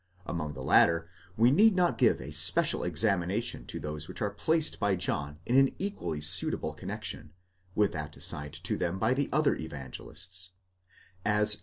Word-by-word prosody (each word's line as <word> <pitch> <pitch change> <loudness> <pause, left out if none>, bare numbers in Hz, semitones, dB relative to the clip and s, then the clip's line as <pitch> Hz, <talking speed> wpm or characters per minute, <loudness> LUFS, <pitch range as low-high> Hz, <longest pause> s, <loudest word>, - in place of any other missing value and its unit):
Among 75 -4 -4
the 65 -1 -8
latter, 85 +5 +3 0.3
we 115 +3 +5
need 210 +7 +5
not 180 -1 +1
give - - +3
a - - -8
special - - +4
examination 95 +5 0
to - - -6
those 75 0 -5
which - - -8
are 105 - -1
placed 155 +11 0
by 100 -3 +1
John 75 -4 -2
in 120 - 0
an 135 0 +4
equally 195 - -4
suitable 75 - +2
connexion, - - -7 0.4
with 105 -1 +2
that 75 0 -6
assigned 75 +2 -1
to - - -1
them 90 +1 -2
by 110 - +1
the 140 +1 -1
other 155 +1 +2
Evangelists 90 +6 -4 0.7
(as 105 0 +2
xii. 105 - +2
95 Hz, 170 wpm, -29 LUFS, 80-120 Hz, 0.7 s, we